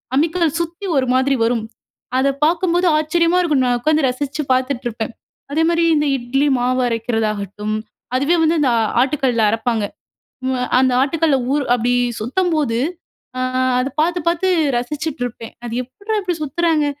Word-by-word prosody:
அம்மிக்கல்ல 330 +4 +2
சுத்தி 340 +3 -4
ஒரு 260 -1 +1
மாதிரி 265 +2 +2
வரும். 230 -1 +1 0.5
அத 265 +1 +2 0.2
பார்க்கும்போது 350 +2 +1
ஆச்சரியமா 335 +3 +2
இருக்கும்! 300 -7 +2
நான் 245 -1 +2
உட்காந்து 305 +3 +2
ரசித்து 280 +4 -3
பார்த்துட்டு 255 0 -1
இருப்பேன். 225 -1 -4 0.4
அதேமாரி 335 +2 +2
இந்த 295 0 +1
இட்லி 265 +4 0
மாவு 255 +1 +1
அரைக்கிறதாகட்டும், 215 -3 -2 0.4
அதுவே 280 +6 +2
வந்து 325 +1 +2 0.2
அ - - +3 0.3
ஆட்டுக்கல்ல 260 -4 0
அரப்பாங்க. 225 -1 0 0.6
ம் 260 0 0
அ - - 0
அந்த 260 0 +3
ஆட்டுக்கல்ல 300 +1 +2 0.2
ஊறு 290 0 +1
அப்பிடி 245 +1 0 0.3
சுத்தம்போது, 295 -1 0 0.6
அ - - -1 0.4
அத 255 - 0
பார்த்து, 350 +2 +1
பார்த்து 345 +2 0 0.3
ரசிச்சுட்டு 285 +3 -4
இருப்பேன். 230 -2 -8
அது 240 +1 -2
எப்புட்றா 405 - -4
இப்பிடி 355 -4 -3
சுத்துறாங்க! 315 +1 +1
275 Hz, 145 wpm, -19 LUFS, 245-325 Hz, 0.6 s, அ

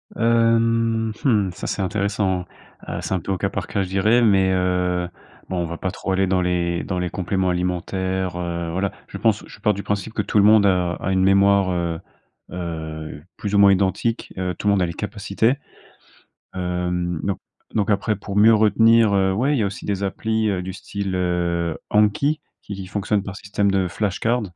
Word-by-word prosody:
Hem 115 -1 +2
mmh. 105 -8 +2
Ça, - - -6
c'est - - -2
intéressant. 100 -2 -1 0.4
Heu, - - -4
c'est - - -3
un 95 - +1
peu 85 - -5
au 95 - 0
cas - - -1
par - - -4
cas, 100 - -1
je 95 - -5
dirais 105 +6 +3
mais 95 -4 +4
heu, 90 -1 0 0.4
bon, 95 - -2
on 85 - 0
va 85 0 -5
pas 95 - -3
trop 95 - -4
aller 95 0 +2
dans 95 0 +2
les 85 -1 0
dans 90 -2 -3
les 90 -1 -1
compléments 95 0 -1
alimentaires, 90 +1 -2
heu, 85 -1 -3
voilà, 95 +2 -1 0.2
je - - -7
pense - - +1
je - - -13
pars 105 - +2
du 100 - -6
principe 105 +2 -3
que - - 0
tout - - -1
le 100 - +6
monde 105 0 +6
a 90 -2 +2
a 95 - -3
une 95 0 +2
mémoire, 100 0 +4
heu, 85 -2 -2 0.5
heu, 80 -4 -6
plus 105 -1 -3
ou - - +5
moins 100 -1 +7
identique, 100 +4 0
heu, 90 -1 -2
tout - - -3
le 100 - +5
monde 95 - +2
a 90 - +3
les 85 - -4
capacités. 105 +4 -1 1.0
Hem 90 -1 -2
donc 100 -1 -1 0.4
donc 105 -1 +1
après, 105 +2 +1
pour 100 0 -7
mieux 110 +2 +6
retenir, 110 +1 +4
heu, 95 -1 +3
ouais, 130 +10 +1
il 130 - 0
y - - +2
a - - +1
aussi 100 - -7
des 100 -1 -2
applis, 110 +2 0
heu, 95 -2 -1
du 95 0 -5
style, 100 -1 -4
heu, 85 -2 -1
Anki 105 +9 +2 0.2
qui 100 - -7
qui 95 -1 -7
fonctionne 100 +1 -1
par 100 -1 -7
système 100 0 -1
de 95 -2 +1
flashcards. 110 +5 -1
95 Hz, 210 wpm, -22 LUFS, 90-105 Hz, 1.0 s, moins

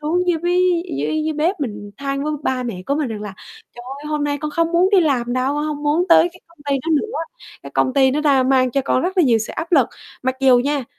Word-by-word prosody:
xuống 355 +4 0
dưới 335 - +2
với 355 0 +1 0.2
dưới 310 0 -1
dưới 315 - -1
bếp 320 +4 -1
mình 210 -6 -5
than 275 0 -3
với 305 - -1
ba 255 -1 -1
mẹ 220 -7 -5
của 280 - 0
mình 295 -3 -1
rằng 215 -2 -5
là 205 -2 -7 0.4
"Trời 240 - -10 0.2
ơi, 300 - -9
hôm 300 -1 -1
nay 290 0 -1
con 300 +2 -4
không 335 +2 0
muốn 355 +3 +3
đi 395 -3 +5
làm 255 -7 0
đâu, 255 +3 0
con 295 +1 -1
hông 300 -1 -4
muốn 300 +4 +2
tới 335 0 +6
cái 360 - -17
công 335 -1 -26
ty 280 - +1
đó 330 - -4
nữa, 430 +9 0 0.5
cái - - -9
công 260 - +1
ty 265 -2 +4
nó 295 +3 -1
đang 270 -4 +3
mang 255 -2 +3
cho 275 - 0
con 260 - +1
rất 370 +3 -2
là 365 - +5
nhiều 240 -6 +3
sự 215 - -5
áp 330 +2 -5
lực". 275 -8 +5 0.4
Mặc 260 0 0
dù 260 -2 +5
nha, 280 +1 -1
290 Hz, 280 wpm, -20 LUFS, 260-330 Hz, 0.5 s, tới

